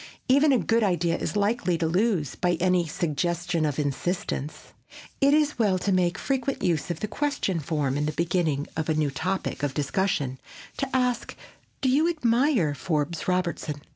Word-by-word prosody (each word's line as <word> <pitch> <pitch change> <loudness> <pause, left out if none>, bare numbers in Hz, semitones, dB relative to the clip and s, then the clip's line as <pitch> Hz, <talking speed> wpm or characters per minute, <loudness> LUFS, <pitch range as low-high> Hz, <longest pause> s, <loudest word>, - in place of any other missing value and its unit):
Even 280 +3 +5
a 260 - +5
good 230 0 +1
idea 175 -4 +1
is - - -3
likely 205 -4 +1
to 165 - -1
lose 180 - +1
by 180 -1 0
any 180 0 +2
suggestion 170 +1 -1
of 145 - -3
insistence. 150 +1 -3 0.5
It 275 +1 +5
is 300 -3 +1
well 200 -5 +3
to 195 +2 -1
make 180 0 +2
frequent 270 -1 -2
use 165 -3 0
of 170 -2 -4
the 215 - -1
question 245 - -1
form 145 -2 -1
in 150 - 0
beginning 160 -2 0
a 160 0 0
new 150 -2 +1
topic 185 +5 -2
of 140 -2 -2
discussion, 145 -3 -1 0.4
to 275 - -2
ask, 250 -2 0 0.5
"Do 265 - +2
you 300 +6 +3
admire 245 - +2
Forbes 155 0 -2
Robertson?" 170 -5 -1
175 Hz, 165 wpm, -26 LUFS, 155-225 Hz, 0.5 s, Even